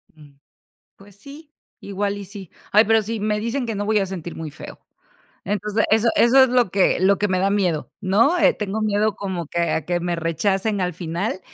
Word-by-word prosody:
Mm, 145 -2 -18 0.6
pues 195 0 -18
sí, 290 +7 -14 0.3
igual 200 0 -3
y 200 - -8
sí. 195 -2 -11 0.2
Ay, 215 +2 +5
pero 225 0 +3
sí, 220 +1 -4
me 210 0 -1
dicen 235 +3 -2
que 225 -2 -4
no, 205 +1 -3
voy 215 -1 +2
a 195 - 0
sentir 175 -3 -7
muy 160 -2 -7
feo. - - -11 0.7
Entonces, 210 +2 -1
eso 225 +2 +3
eso 260 +3 +6
es - - -1
lo 245 -7 +2
que 190 -2 +2
lo 195 +1 +3
que 205 - +1
me 185 -1 0
da 195 +1 +1
miedo, 180 -7 -1
¿no? 230 - +2
Eh, - - +4
tengo 210 +1 -4
miedo 215 0 0
como 185 -5 -4
que 170 - -4
a 160 - -1
que 175 +1 -1
me 175 0 -2
rechacen 190 +5 -1
al 180 -2 -2
final 180 +4 -4
200 Hz, 215 wpm, -21 LUFS, 185-220 Hz, 0.7 s, eso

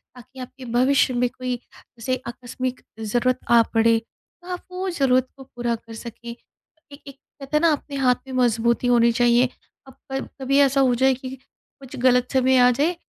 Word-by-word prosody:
ताकि 255 +2 -14
आपके 255 +1 -9
भविष्य 260 +1 +3
में 245 0 +1
कोई 255 0 -4
जैसे 245 +1 -7
आकस्मिक 250 +1 -5 0.2
ज़रूरत 245 +4 0
आ 235 -1 +7
पड़े, 225 0 +4
तो 350 +9 -24
आप 360 - -5
वो 370 +1 -3
ज़रूरत 260 -6 +2
को 270 - -11
पूरा 240 -2 -3
कर 230 0 -13
सकें। 235 +1 -9
ए 290 +4 -18
एक 275 -1 -13 0.2
कहते 275 +2 -1
हैं 300 - +1
ना, 335 -1 +4
अपने 285 -1 -4
हाथ 255 -2 +3
में 260 - -8
मज़बूती 235 0 +1
होनी 235 -1 +4
चाहिए। 240 +1 +3 0.4
अब 265 - -13 0.2
पर 270 0 -2 0.2
कभी 275 +1 +1
ऐसा 275 -1 +4
हो 250 -2 +3
जाए 265 +2 +3
कि 260 0 -7
कुछ 265 0 -17
गलत 250 0 +3
समय 260 0 +3
आ 250 0 +6
जाए 300 +8 0
255 Hz, 190 wpm, -22 LUFS, 240-270 Hz, 0.4 s, आ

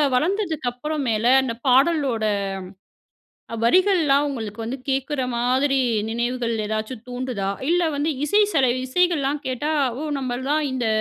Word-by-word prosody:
வளர்ந்ததுக்கப்புற 310 - -1 0.2
மேல, 220 0 0 0.2
அந்த 245 -3 -2
பாடலோட 265 -3 +3 1.4
வரிகள்லாம் 305 - +3
உங்களுக்கு 225 -5 -5
வந்து 235 +4 -4
கேக்குற 270 +1 -1
மாதிரி 260 +3 +1 0.3
நினைவுகள் 235 0 -1
ஏதாச்சும் 215 +2 -4
தூண்டுதா? 245 -5 -3 0.2
இல்ல 350 +1 +3
வந்து 290 +3 0
இசை 410 +7 +3
செல 270 -5 +3 0.2
இசைகள்லாம் 295 -1 +1
கேட்டா 260 +4 -2 0.3
ஓ - - -3
நம்மள்லாம் 265 +4 -1
இந்த 250 -3 -1
265 Hz, 115 wpm, -22 LUFS, 240-300 Hz, 1.4 s, பாடலோட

